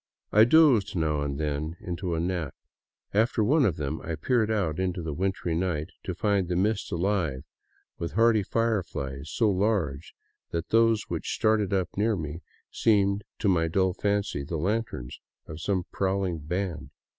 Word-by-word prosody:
I 110 +1 +7
dozed 120 -8 +5
now 75 -3 0
and 70 -1 -3
then 75 +2 -2
into 90 0 -3
a - - -1
nap. 85 -3 -2 0.6
After 110 +2 +2
one 140 +5 +4
of 90 - +1
them 75 +2 -3
I 80 -1 -4
peered 110 +7 +1
out 95 -8 0
into 90 -2 -1
the 80 -2 -3
wintry 95 0 -1
night, 85 -2 -1
to 90 - -3
find 100 0 +1
the 90 - -1
mist 100 +3 0
alive 85 -7 0 0.6
with 85 - -4
hardy 115 0 +4
fireflies 90 -11 -2
so 115 - +2
large 90 -7 -1 0.3
that 85 0 -3
those 115 -1 +4
which - - -4
started 110 -2 +2
up 95 -2 +1
near 110 +2 +2
me 80 -1 -5 0.3
seemed 100 -2 +2
to 105 - -1
my 85 -4 +3
dull 95 +2 +1
fancy 100 -6 -1
the 80 +4 -4
lanterns 100 - -2 0.3
of 80 +1 -8
some 95 -2 0
prowling 95 -3 -1
band. 90 +2 -3
95 Hz, 165 wpm, -27 LUFS, 80-105 Hz, 0.6 s, I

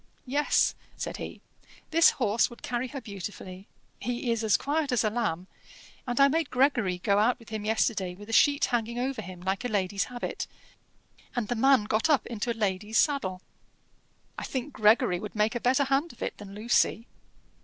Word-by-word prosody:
"Yes," 285 +3 +2 0.2
said - - -4
he. - - -7 0.5
"This 330 +1 +7
horse 230 -3 +1
would 240 - -14
carry 245 +1 -2
her 275 +2 -6
beautifully: 195 -2 -8 0.3
he 245 +1 -2
is 230 -1 -1
as 215 -2 +4
quiet 290 0 -1
as 245 - +2
a 215 - +1
lamb, 195 -7 -1 0.6
and 245 +1 -1
I 275 - +8
made 320 +1 0
Gregory 250 -8 +2
go 200 +3 +2
out 230 +4 +3
with 230 -3 -16
him 215 -1 -4
yesterday 210 -4 0
with 205 +2 -12
a 225 - -6
sheet 285 +4 +5
hanging 235 -1 -1
over 260 +2 -2
him 180 0 -9
like 190 +1 -2
a - - 0
lady's 200 -3 0
habit, 245 -1 -5 0.9
and 240 -4 -2
the 245 - 0
man 265 0 +4
got 215 +8 0
up 295 -4 +3
into 235 0 -3
a 230 - -5
lady's 210 +1 -1
saddle." 200 -11 +1 1.0
"I - - -6
think 265 +2 -4
Gregory 210 -4 +3
would 210 +2 -7
make 210 +1 +2
a 240 - -2
better 255 +4 +3
hand 275 +4 0
of - - -8
it - - -3
than 200 -1 -10
Lucy." 230 +1 +1
230 Hz, 190 wpm, -28 LUFS, 205-255 Hz, 1.0 s, I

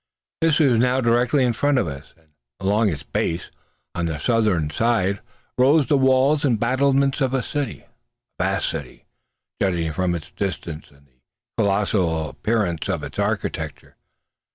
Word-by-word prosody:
This 165 -2 +3
was 130 -8 +4
now 125 +2 +2
directly 125 +3 +2
in 120 - +1
front 145 +4 +1
of 120 - +1
us; 70 -1 -8
and 80 -1 -29 0.3
along 105 +3 +2
its 75 -5 -4
base, 85 +1 -2 0.4
on 85 -1 -2
the 80 -2 -3
southern 100 -6 +1
side, 100 0 +1 0.4
rose 140 +3 +5
the 145 - +2
walls 135 +2 +3
and 120 -7 +2
battlements 135 +3 +2
of 135 0 +1
a 130 - 0
city 145 +2 -3 0.6
a - - +1
vast 95 +1 0
city, 75 -6 -7 0.6
judging 85 -5 0
from 90 +1 0
its 85 +1 -8
distance 85 -5 -5
and 70 0 -24
the 65 - -33 0.4
colossal 95 -6 +1
appearance 105 -8 -1
of - - -2
its - - -7
architecture. - - -3
105 Hz, 155 wpm, -22 LUFS, 85-130 Hz, 0.6 s, rose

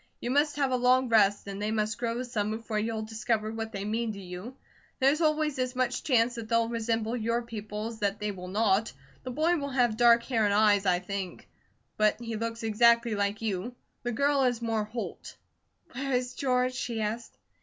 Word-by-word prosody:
You 240 - -3
must 290 +2 +2
have 275 -2 +1
a 255 - +2
long 250 +1 +3
rest, 205 -3 +4
and 200 0 -6
they 210 - -1
must 215 0 -1
grow 235 +1 -1
some 220 -4 -2
before 220 0 -3
you'll 220 0 -2
discover 220 0 -1
what 225 0 -5
they 200 -1 -4
mean 220 +1 -1
to 200 - -8
you. 185 +7 -8 0.4
There's 275 +5 +3
always 305 -3 +1
as 255 0 -1
much 255 -1 0
chance 245 -3 +3
that 230 -2 -7
they'll 230 0 +2
resemble 230 0 -1
your 230 +1 -1
people 215 -2 -6
as 225 -1 -6
that 200 0 -1
they 210 0 -2
will 180 -2 -8
not. 205 +2 +1 0.3
The - - -6
boy 315 +7 +1
will 280 -2 -3
have 245 -4 +1
dark 235 -1 +6
hair 230 -4 0
and 205 -1 +2
eyes 205 -2 +4
I 180 -1 +4
think, 190 -1 -5 0.5
but 215 +1 +3
he 230 -1 -5
looks 230 +1 -4
exactly 235 +1 +4
like 205 +1 -1
you. 220 +3 -2 0.3
The 240 - -2
girl 280 +4 +2
is 245 -3 +2
more 225 -2 -1
Holt." 230 +2 -7 0.5
"Where 270 +2 -3
is 250 0 0
George?" 255 -1 +1
she 240 -2 -3
asked. 220 +2 -4
230 Hz, 205 wpm, -29 LUFS, 215-250 Hz, 0.5 s, dark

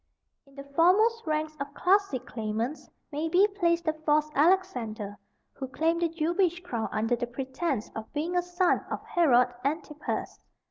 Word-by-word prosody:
In 275 - -21
the 275 - -8
foremost 370 +10 +3
ranks 310 0 -1
of 280 0 -5
classic 370 - +2
claimants 225 +5 -3 0.2
may 305 +3 -2
be 370 +5 +5
placed 345 -4 0
the 315 - +2
false 305 -1 +1
Alexander, 250 - +1 0.3
who 265 - -6
claimed 325 +6 0
the 340 - +2
Jewish 340 +2 0
crown 235 -10 -3
under 225 +3 +1
the 240 0 -3
pretence 265 0 -3
of 220 0 -7
being 320 +4 -2
a 355 - +4
son 355 +1 +1
of - - -4
Herod 250 -7 +3
Antipas. 300 +1 -3
310 Hz, 155 wpm, -28 LUFS, 255-345 Hz, 0.3 s, be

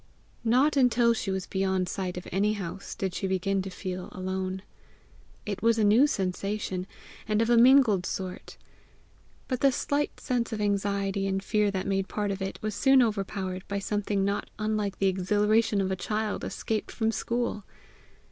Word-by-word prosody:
Not 255 +6 +3
until 245 -3 +4
she 215 -3 -3
was 190 -1 -2
beyond 190 -1 0
sight 180 -1 -3
of 180 - -7
any 205 +3 +2
house, 195 -1 -6
did 190 -2 -2
she 195 - -2
begin 190 +1 0
to 195 - -5
feel 185 0 -5
alone. 185 0 -3 0.8
It 200 -3 -4
was 230 0 +3
a 220 - +2
new 220 +8 +6
sensation, 190 -3 -2 0.4
and 215 -1 +1
of 230 +1 +2
a - - +6
mingled 235 -6 +6
sort. 185 -1 -6 0.9
But 255 -2 -2
the 275 - +4
slight 285 +3 -1
sense 245 -3 -1
of 220 - -3
anxiety 200 -1 0
and 195 0 -1
fear 210 0 +2
that 190 -2 -3
made 195 -1 0
part 205 -1 -2
of 195 0 -4
it, 195 0 -3
was 215 0 -1
soon 270 +4 +5
overpowered 195 -4 -2
by 200 - -2
something 200 -1 -1
not 200 +1 -2
unlike 215 -2 -1
the 195 - 0
exhilaration 205 +3 +2
of 190 0 -1
a - - +1
child 215 +2 -2
escaped 220 -1 -3
from 225 -1 0
school. 235 -2 -2
200 Hz, 175 wpm, -28 LUFS, 190-220 Hz, 0.9 s, new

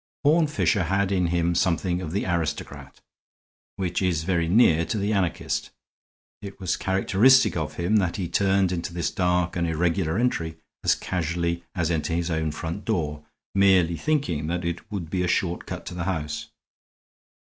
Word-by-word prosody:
Horne 155 +2 +5
Fisher 110 - +1
had 95 +3 +1
in 90 -3 +2
him 85 0 +1
something 90 +1 +1
of 80 - -5
the 100 - -1
aristocrat, 85 -4 -3 0.7
which 90 -2 -2
is 90 -4 +1
very 85 -1 0
near 85 -4 +5
to 85 - -2
the 105 +1 0
anarchist. 95 -4 -1 0.7
It 100 -1 -9
was 95 -2 -1
characteristic 105 +7 +4
of 75 -3 -3
him 90 +7 +1
that 95 -4 +1
he 90 -4 -2
turned 95 +1 +2
into 85 0 -4
this 85 -2 -1
dark 90 -1 0
and 85 -1 0
irregular 85 +1 0
entry 85 -10 -1 0.3
as - - +4
casually 85 -1 -2
as 85 -2 0
into 80 0 -1
his 85 +1 -1
own 80 -1 0
front 80 +6 -5
door, 75 -8 -2 0.3
merely 95 -4 +4
thinking 110 - -1
that 85 +1 -2
it 85 +5 -4
would 85 -6 -5
be 95 - 0
a 90 - 0
short 90 0 -1
cut - - -6
to - - -6
the 85 -1 -4
house. 80 -6 -3
90 Hz, 170 wpm, -25 LUFS, 85-95 Hz, 0.7 s, Horne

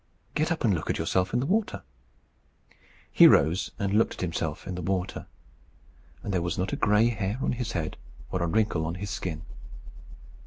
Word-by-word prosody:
"Get 155 +3 0
up 165 - -1
and 110 -5 +4
look 80 - -3
at - - +1
yourself 95 0 0
in 120 - +1
the - - -1
water." 210 +7 0 1.3
He - - +8
rose 85 +5 +4
and 100 0 -1
looked 110 +2 +2
at - - -9
himself 80 -3 -3
in 95 - -4
the 90 - -4
water, 95 +1 -2 1.0
and 100 - -3
there 90 - +1
was 85 -1 -2
not 95 +2 -1
a - - +2
gray 105 +3 +3
hair 105 -1 -2
on - - 0
his 120 -2 -3
head 80 -3 -3 0.3
or 90 - -1
a 85 - +1
wrinkle 105 -3 +1
on 85 - -3
his 100 +2 -5
skin. 85 -6 -4
95 Hz, 195 wpm, -27 LUFS, 85-110 Hz, 1.3 s, He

